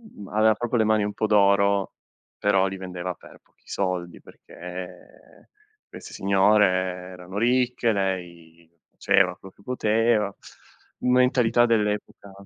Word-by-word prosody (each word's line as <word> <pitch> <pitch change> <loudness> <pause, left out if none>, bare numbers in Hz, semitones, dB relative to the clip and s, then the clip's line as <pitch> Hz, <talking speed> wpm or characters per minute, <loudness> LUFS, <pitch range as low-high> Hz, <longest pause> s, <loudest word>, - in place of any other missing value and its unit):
mh 100 - -10
aveva 110 +1 +3
proprio 120 +2 -2
le 110 - +3
mani 110 -1 +2
un 105 - -3
po' 110 - -2
d'oro, 100 -1 +2 0.5
però 95 -2 +2
li 95 - -6
vendeva 90 -1 -6
per - - -17
pochi - - -36
soldi 90 -3 -3
perché 90 +1 -12 0.4
queste - - -12
signore 100 +2 +3 0.5
erano 90 +2 -9
ricche, 125 0 +1
lei 85 -4 -4 0.2
faceva 90 -2 +2
quello 95 - -14
che - - -22
poteva. 110 -2 0 0.7
Mentalità 125 -2 +3
dell'epoca. 105 -2 -2
100 Hz, 125 wpm, -24 LUFS, 95-110 Hz, 0.7 s, aveva